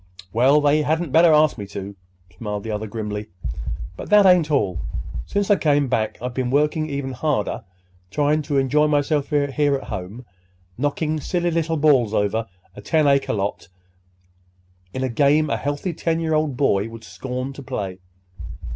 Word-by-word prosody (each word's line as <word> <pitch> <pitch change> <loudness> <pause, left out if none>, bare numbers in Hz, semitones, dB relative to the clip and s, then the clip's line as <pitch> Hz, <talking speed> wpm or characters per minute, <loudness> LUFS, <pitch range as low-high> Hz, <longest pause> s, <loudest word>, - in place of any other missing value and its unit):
"Well, 130 +6 +5
they 145 +1 +3
hadn't 160 +1 -1
better 165 +2 +6
ask 155 -4 +4
me 100 - -6
to," 100 0 -7 0.4
smiled 105 -3 -5
the 110 - -4
other 105 +1 -3
grimly. 105 -1 -5 0.7
"But - - -8
that 210 -1 +6
ain't 180 -4 +5
all. 100 - +1 0.5
Since 205 0 0
I 205 - +5
come 145 -3 +2
back 110 -3 -1
I've 125 +1 -4
been 125 -1 -1
working 150 +3 +1
even 140 -2 -3
harder 145 -2 -1 0.5
trying 150 +5 +1
to 145 - +1
enjoy 140 +3 +3
myself 145 -1 +1
here 145 -1 +1
at 135 - -4
home—knockin' 95 - -5
silly 175 +3 -1
little 165 0 0
balls 135 -8 +3
over 105 +2 0 0.3
a - - -9
ten 160 -2 +2
acre 140 -1 +3
lot 100 -4 -3 1.2
in 130 - -3
a - - +1
game 145 +4 +2
a - - +1
healthy 145 +5 -3
ten 165 0 -1
year 160 -1 -1
old 155 -4 0
boy 110 -7 +1
would 115 0 -11
scorn 125 +7 -5
to 140 - -9
play." 95 -7 -5
140 Hz, 165 wpm, -22 LUFS, 110-155 Hz, 1.2 s, better